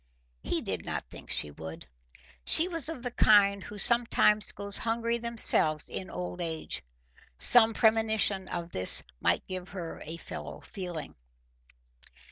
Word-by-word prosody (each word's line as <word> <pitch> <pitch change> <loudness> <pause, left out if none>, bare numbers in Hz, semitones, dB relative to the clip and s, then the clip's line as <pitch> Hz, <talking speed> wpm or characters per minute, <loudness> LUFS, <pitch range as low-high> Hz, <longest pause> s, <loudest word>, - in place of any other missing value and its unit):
He - - -2
did - - -3
not - - -5
think - - -12
she 75 - -1
would. 80 +2 -9 0.6
She 330 - +3
was 330 -4 -1
of 270 -7 -7
the 245 - -4
kind 200 -3 +4
who 210 - -9
sometimes 215 -1 +3
go 200 0 -8
hungry 230 +2 -1
themselves 220 -10 +3
in 190 - -6
old 180 0 -6
age. 160 -2 -5 0.6
Some 225 - +7
premonition 220 -4 +1
of 170 -1 -6
this 95 -8 0 0.2
might - - +1
give 185 0 -6
her 170 -2 -7
a 160 +2 -7
fellow - - -8
feeling. 175 -5 -7
200 Hz, 140 wpm, -28 LUFS, 170-230 Hz, 0.6 s, Some